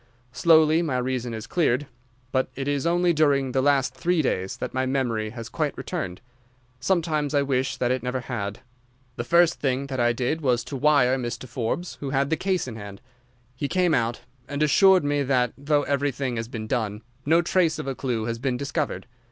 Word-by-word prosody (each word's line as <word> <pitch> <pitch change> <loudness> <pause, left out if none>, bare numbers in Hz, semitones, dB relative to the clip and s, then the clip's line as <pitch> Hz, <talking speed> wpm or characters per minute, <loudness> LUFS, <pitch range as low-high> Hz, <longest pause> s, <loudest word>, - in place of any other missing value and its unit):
Slowly 160 0 +5
my 150 -7 -1
reason 125 -1 -2
has 110 -1 -5
cleared, 150 -5 +1 0.5
but 130 -1 +1
it 135 +1 -4
is 145 +2 0
only 175 0 +3
during 140 -4 +2
the 130 - +1
last 135 -2 +2
three 165 +5 +1
days 95 -7 -1
that - - -5
my 130 0 0
memory 120 -5 -1
has 115 0 -7
quite - - -2
returned. 90 0 -4 0.6
Sometimes 155 -5 0
I 140 - +3
wish 130 -1 -1
that 125 0 0
it 130 -1 0
never 125 +1 -2
had. 105 -3 -4 0.5
The 120 - -3
first 170 +6 +3
thing 135 0 0
that 135 -2 -4
I 120 0 +3
did 130 +7 -1
was 125 -4 +1
to 140 - -7
wire 135 -2 +4
to - - -4
Mr. 120 +1 -5
Forbes, 125 +8 -3
who 140 - -4
had 140 +2 0
the - - +4
case 185 -1 -1
in 115 -3 -6
hand. 100 -2 -9 0.6
He 140 +3 -2
came 180 +1 +2
out, 115 -2 0 0.3
and 145 +1 -1
assures 185 +4 +5
me 145 0 +1
that, 125 -3 +1
though 145 +1 +1
everything 140 -3 -1
has 115 0 -3
been 115 -3 -6
done, 110 -3 -2 0.2
no 165 +5 +3
trace 170 -3 +2
of - - -5
a 135 - -2
clue 125 -4 -2
has 115 0 -3
been 130 -1 -1
discovered. 140 +2 -3
135 Hz, 200 wpm, -25 LUFS, 120-150 Hz, 0.6 s, Slowly